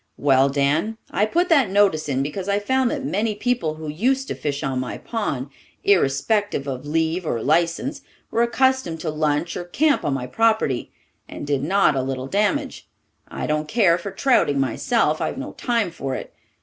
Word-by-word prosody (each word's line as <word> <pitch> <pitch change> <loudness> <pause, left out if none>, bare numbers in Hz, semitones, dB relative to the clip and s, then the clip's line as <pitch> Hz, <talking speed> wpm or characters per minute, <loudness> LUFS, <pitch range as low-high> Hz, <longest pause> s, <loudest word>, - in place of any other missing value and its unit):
"Well, 135 -1 +4
Dan, 145 +10 0
I 210 - +2
put 350 +10 +1
that 280 - +4
notice 190 -6 +2
in 135 0 0
because 180 +7 -4
I 200 - +2
found 260 +4 +1
that - - -3
many 210 +2 -1
people 210 -8 -1
who 155 0 -8
used 260 - 0
to - - -1
fish 145 0 -3
on 135 -2 -1
my 130 - -4
pond, 140 - -3 0.3
irrespective 200 0 +2
of 135 0 -5
leave 160 +3 0
or 120 -8 -2
licence, 170 - 0 0.3
were 230 - +1
accustomed 250 -7 +1
to 155 - -2
lunch 155 +2 -1
or 180 - -4
camp 285 - +1
on 140 - 0
my 125 -2 -3
property, 220 - +1 0.4
and - - -7
did 140 -2 0
not 190 +2 +3
a 135 - +1
little 130 0 -3
damage. 210 - -1 0.4
I - - -5
don't 150 0 -1
care 180 -3 +3
for 185 - -5
trouting 195 - +2
myself; 155 - +1
I've - - -2
no 280 +2 -5
time 230 -7 -1
for 135 -5 -4
it. - - -7
170 Hz, 185 wpm, -22 LUFS, 145-225 Hz, 0.4 s, Well